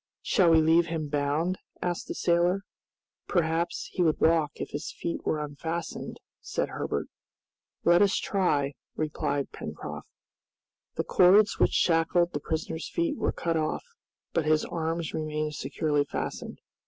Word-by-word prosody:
"Shall 180 Hz, -3 st, +4 dB
we 160 Hz, -1 st, +6 dB
leave 165 Hz, +2 st, +4 dB
him 160 Hz, -2 st, -3 dB
bound?" 150 Hz, +6 st, 0 dB, 0.2 s
asked 175 Hz, -1 st, -2 dB
the -, -, -4 dB
sailor. 175 Hz, +3 st, +2 dB, 0.6 s
"Perhaps 170 Hz, -1 st, 0 dB
he 185 Hz, -, -2 dB
would 160 Hz, -3 st, +3 dB
walk 160 Hz, -3 st, +3 dB
if -, -, -6 dB
his 145 Hz, +2 st, -4 dB
feet 170 Hz, -, -4 dB
were 155 Hz, -, 0 dB
unfastened," 160 Hz, +3 st, -5 dB, 0.2 s
said -, -, -2 dB
Herbert. -, -, -2 dB, 0.8 s
"Let 175 Hz, +1 st, +5 dB
us 200 Hz, -1 st, +4 dB
try," 145 Hz, -8 st, +1 dB, 0.2 s
replied 145 Hz, -2 st, -2 dB
Pencroft. -, -, -7 dB, 0.9 s
The -, -, 0 dB
cords 200 Hz, +3 st, +5 dB
which -, -, +3 dB
shackled 170 Hz, +1 st, +3 dB
the 145 Hz, -, -1 dB
prisoner's 160 Hz, +2 st, -3 dB
feet 335 Hz, -3 st, 0 dB
were -, -, 0 dB
cut 165 Hz, -1 st, -1 dB
off, 155 Hz, -1 st, -1 dB, 0.5 s
but 165 Hz, -, +1 dB
his 155 Hz, 0 st, +3 dB
arms 165 Hz, -1 st, -2 dB
remained 155 Hz, -1 st, -2 dB
securely 145 Hz, +1 st, 0 dB
fastened. -, -, -5 dB
165 Hz, 140 wpm, -28 LUFS, 155-175 Hz, 0.9 s, we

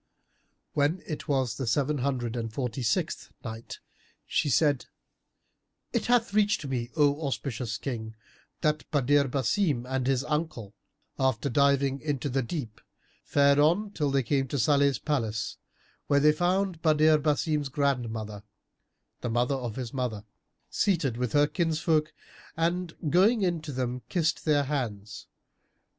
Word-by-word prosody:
When 150 Hz, +5 st, +1 dB
it 155 Hz, -, -6 dB
was 130 Hz, -5 st, 0 dB
the 130 Hz, -, -3 dB
Seven 145 Hz, +5 st, +1 dB
Hundred 125 Hz, -3 st, -1 dB
and 115 Hz, -2 st, -3 dB
Forty 125 Hz, +1 st, -3 dB
sixth 115 Hz, -2 st, -1 dB
Night, 115 Hz, 0 st, -7 dB, 0.5 s
She 145 Hz, -, 0 dB
said, 140 Hz, +2 st, +2 dB, 1.1 s
It 235 Hz, -3 st, 0 dB
hath 235 Hz, -4 st, +2 dB
reached 205 Hz, -6 st, +2 dB
me, 125 Hz, -3 st, -2 dB
O 145 Hz, -1 st, +3 dB
auspicious 120 Hz, -4 st, -3 dB
King, 110 Hz, -4 st, -5 dB, 0.5 s
that 150 Hz, 0 st, 0 dB
Badr 145 Hz, 0 st, +3 dB
Basim 135 Hz, -, 0 dB
and 130 Hz, -1 st, -1 dB
his 135 Hz, -1 st, +1 dB
uncle, 150 Hz, -9 st, -3 dB, 0.5 s
after 130 Hz, 0 st, +1 dB
diving 140 Hz, 0 st, +3 dB
into 145 Hz, -2 st, -2 dB
the 135 Hz, +1 st, 0 dB
deep, 120 Hz, -4 st, -5 dB, 0.4 s
fared 140 Hz, 0 st, +4 dB
on 175 Hz, +8 st, +3 dB
till 150 Hz, -7 st, -1 dB
they 135 Hz, -1 st, +1 dB
came 135 Hz, +2 st, 0 dB
to 140 Hz, -, -3 dB
Salih's 140 Hz, 0 st, +3 dB
palace, 115 Hz, -7 st, -2 dB, 0.5 s
where 145 Hz, -, +4 dB
they 150 Hz, +1 st, +6 dB
found 180 Hz, +2 st, 0 dB
Badr 155 Hz, -1 st, +5 dB
Basim's 150 Hz, -1 st, 0 dB
grandmother, 115 Hz, -7 st, -2 dB, 0.8 s
the 120 Hz, -, -3 dB
mother 120 Hz, +4 st, +1 dB
of 120 Hz, -5 st, -3 dB
his 125 Hz, -3 st, -5 dB
mother, 120 Hz, -5 st, -3 dB, 0.5 s
seated 160 Hz, -, +1 dB
with 125 Hz, -1 st, -2 dB
her 145 Hz, 0 st, +5 dB
kinsfolk 160 Hz, -1 st, 0 dB, 0.5 s
and, 170 Hz, +1 st, -1 dB, 0.2 s
going 205 Hz, +5 st, +4 dB
in 175 Hz, -3 st, 0 dB
to 155 Hz, -2 st, -6 dB
them, 125 Hz, -1 st, -3 dB
kissed 170 Hz, -2 st, 0 dB
their 150 Hz, -2 st, +3 dB
hands. 110 Hz, -7 st, -4 dB
140 Hz, 140 wpm, -28 LUFS, 125-155 Hz, 1.1 s, they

